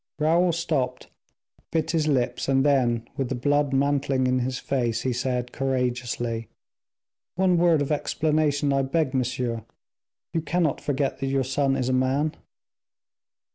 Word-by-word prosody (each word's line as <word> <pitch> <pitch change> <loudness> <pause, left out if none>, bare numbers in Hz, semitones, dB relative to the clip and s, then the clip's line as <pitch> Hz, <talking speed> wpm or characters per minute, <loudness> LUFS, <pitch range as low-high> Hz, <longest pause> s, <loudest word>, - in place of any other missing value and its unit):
Raoul 170 +3 +3
stopped, 150 -6 -2 0.6
bit 160 -2 0
his 160 -2 +1
lips, 135 -2 0
and 135 0 +3
then, 120 -5 +2
with 135 -3 -1
the 130 - -1
blood 145 +3 +1
mantling 135 -1 +1
in 130 0 +2
his 125 +1 -2
face, 120 -4 -1
he 130 - 0
said, 125 0 -2
courageously, 120 -3 -2 0.9
"One 185 0 +3
word 170 -3 +4
of 145 - -4
explanation, 150 -1 +1
I 135 - +2
beg, 135 +1 0
monsieur. 125 -3 -1 0.7
You 165 - 0
cannot 165 -2 0
forget 140 -1 -1
that 135 - -2
your 135 0 +1
son 135 +1 +1
is 125 - -1
a 130 - +1
man." 135 +4 +1
135 Hz, 145 wpm, -25 LUFS, 125-150 Hz, 0.9 s, word